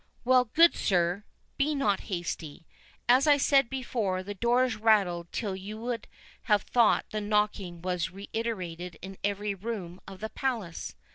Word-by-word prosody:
"Well, 255 0 +5
good 330 +9 +5
sir, 180 +2 +1 0.3
be 295 +2 +1
not 210 -8 +1
hasty. 170 -3 -4 0.4
As 255 +4 +5
I 290 -1 +6
said 275 -3 +3
before, 225 -8 -2
the 205 +2 -5
doors 240 +3 +2
rattled 195 -6 +2
till 200 -4 -2
you 200 +3 -7
would 230 0 -4 0.4
have 210 -3 +3
thought 235 -3 +3
the 215 - -2
knocking 205 -4 -1
was 180 -2 -1
reiterated 185 -4 -5
in 190 0 -8
every 205 +1 -1
room 190 -3 -6
of 190 -1 -10
the 220 +2 -4
Palace. 225 -12 -3
210 Hz, 150 wpm, -29 LUFS, 185-235 Hz, 0.4 s, I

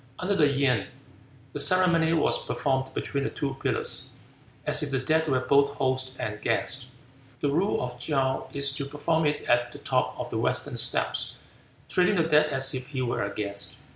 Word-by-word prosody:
Under 195 +2 -1
the 150 -5 +5
Yin, 135 -6 +1 0.7
the - - -4
ceremony 175 -3 +4
was 165 - +2
performed 135 -1 -1
between 140 -1 -2
the - - -1
two 140 -2 -3
pillars, - - 0 0.5
as - - +3
if 150 - -1
the 135 - 0
dead 160 +5 +1
were 130 -3 +2
both 140 +2 +3
host 130 -1 -1
and 105 0 -4
guest. 125 +3 -1 0.5
The 145 - +1
rule 180 +8 +1
of 125 0 -5
Chow 135 -1 0
is 140 0 -1
to 140 - -3
perform 150 +2 0
it 150 - -2
at 120 0 +2
the - - -9
top - - -1
of - - -5
the - - -1
western - - -1
steps, - - +1 0.5
treating 180 +2 +3
the 165 - +3
dead 150 -1 +4
as 135 -2 +2
if 130 -1 -4
he 130 -3 -3
were 120 - -1
a 100 - -3
guest. 100 -1 -4
140 Hz, 190 wpm, -27 LUFS, 130-150 Hz, 0.7 s, the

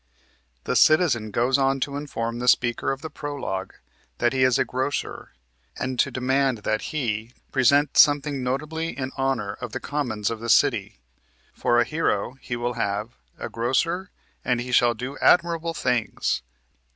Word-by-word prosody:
The - - -2
Citizen 155 -9 +4
goes 125 +5 +1
on 135 0 +2
to 140 +1 -2
inform 120 -5 -4
the 125 - -3
Speaker 120 0 +2
of 135 0 -5
the 160 - -5
Prolog 140 -11 -5 0.4
that 120 - +1
he 130 - 0
is 130 -1 +4
a - - +2
grocer, 130 +3 -3 0.4
and 130 -2 -3
to - - +3
demand 130 -2 0
that 110 0 -1
he 115 -5 -2 0.2
"present 140 +2 +3
something 145 -1 +4
notably 150 +6 -3
in 130 -1 -3
honor 135 -7 -1
of 120 -3 -6
the - - -3
commons 120 -8 -2
of 115 - -4
the 115 +1 -5
city." - - +3 0.6
For 120 - +2
a - - +5
hero 140 -8 -1
he 120 - -4
will 120 +1 -2
have 105 -1 -2 0.3
"a - - -5
grocer, 165 +11 -1 0.3
and 125 -1 +1
he 125 +1 -5
shall 120 -1 +4
do 125 +5 -6
admirable 170 -1 +3
things." 125 -5 -1
130 Hz, 165 wpm, -24 LUFS, 120-145 Hz, 0.6 s, a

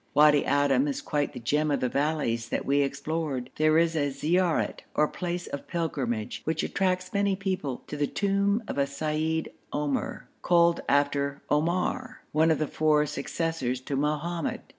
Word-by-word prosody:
Wadi 150 -1 +6
Adim 140 -1 +3
is 140 - -2
quite 145 -1 -1
the - - -6
gem 150 +6 +1
of 145 - +1
the 125 - +1
valleys 135 -5 -1
that - - -2
we 140 +1 +3
explored. 140 -2 -2
There 155 0 +4
is 165 0 +3
a 145 -2 +1
ziaret 165 +5 +1 0.2
or 150 - +4
place 175 +1 -4
of 140 - -6
pilgrimage, 120 -11 -2
which 160 0 -1
attracts 185 -1 -1
many 200 -1 +2
people, 185 -10 -3
to - - -6
the 145 -1 0
tomb 200 - +1
of - - -3
a 140 - +2
seyyid 155 +3 -1 0.2
Omr, 145 -2 -2 0.2
called 170 -1 +4
after 140 0 +1
Omar, 180 +12 0
one 160 +2 +3
of 160 - +3
the 155 - 0
four 150 0 +2
successors 150 -3 -2
to 135 +2 -4
Mohammed. 150 +4 -1
150 Hz, 165 wpm, -27 LUFS, 140-170 Hz, 0.2 s, Wadi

